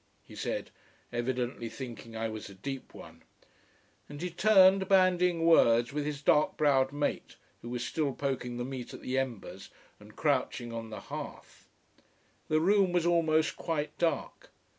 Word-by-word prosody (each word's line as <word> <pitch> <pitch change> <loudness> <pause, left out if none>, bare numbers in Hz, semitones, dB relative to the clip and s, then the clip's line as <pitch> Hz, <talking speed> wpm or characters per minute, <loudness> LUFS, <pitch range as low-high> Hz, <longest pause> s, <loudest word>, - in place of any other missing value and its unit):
he - - -15
said, - - -4 0.4
evidently 120 -1 -2
thinking 115 -2 -8
I 115 0 -1
was 110 -2 -7
a 100 - -12
deep 135 +7 -7
one. - - -12 0.9
And 145 0 -8
he 180 +2 -3
turned 190 0 +5
bandying 180 -3 +3
words 120 -6 +5
with 150 0 -2
his 145 -1 -4
dark 150 +1 +3
browed 135 -3 +3
mate, 145 0 -3 0.3
who 120 - -8
was 125 0 -3
still 150 +1 -1
poking 125 -3 -3
the 120 - -3
meat 130 -2 -6
at - - -11
the 130 +1 0
embers 125 -6 -5 0.3
and - - -16
crouching 120 -1 -1
on 115 -1 -6
the 110 - -7
hearth. - - -9 0.8
The 155 - +2
room 195 +2 +3
was 175 -1 +1
almost 160 -2 +2
quite 155 -3 -3
dark. 165 - -2
140 Hz, 160 wpm, -30 LUFS, 120-165 Hz, 0.9 s, turned